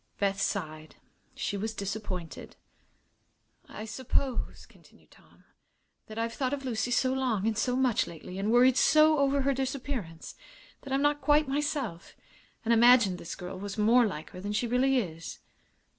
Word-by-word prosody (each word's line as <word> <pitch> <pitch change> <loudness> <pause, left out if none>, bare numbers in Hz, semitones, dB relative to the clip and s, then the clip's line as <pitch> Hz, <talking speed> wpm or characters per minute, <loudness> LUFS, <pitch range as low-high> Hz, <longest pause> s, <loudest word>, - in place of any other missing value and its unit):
Beth 195 -1 0
sighed. 155 -6 -3 0.4
She - - -3
was 220 +2 -4
disappointed. 200 -4 -6 1.1
"I 215 - -7
suppose," 260 +2 -2
continued - - -23
Tom, - - -23 0.6
"that 220 - -10
I've 230 0 -2
thought 260 +1 -2
of 275 -1 -4
Lucy 235 -1 -1
so 255 +2 +2
long 250 -7 -1
and 225 -1 +1
so 245 +4 0
much, 255 -3 +1
lately, 175 +3 -9
and 205 +3 0
worried 250 +1 +5
so 310 0 +5
over 280 0 +2
her 275 +1 +1
disappearance, 260 - -4 0.5
that 275 - -10
I'm 270 +1 +1
not 290 0 +1
quite 295 0 +3
myself, 275 - -3 0.5
and 230 - +3
imagined 230 -5 +5
this 170 - -7
girl 185 +1 -7
was 200 +1 -6
more 230 +3 +4
like 155 -6 -7
her 180 - -9
than 205 +2 -4
she 210 - 0
really 255 +3 +2
is. 165 -8 -4
230 Hz, 160 wpm, -29 LUFS, 195-265 Hz, 1.1 s, worried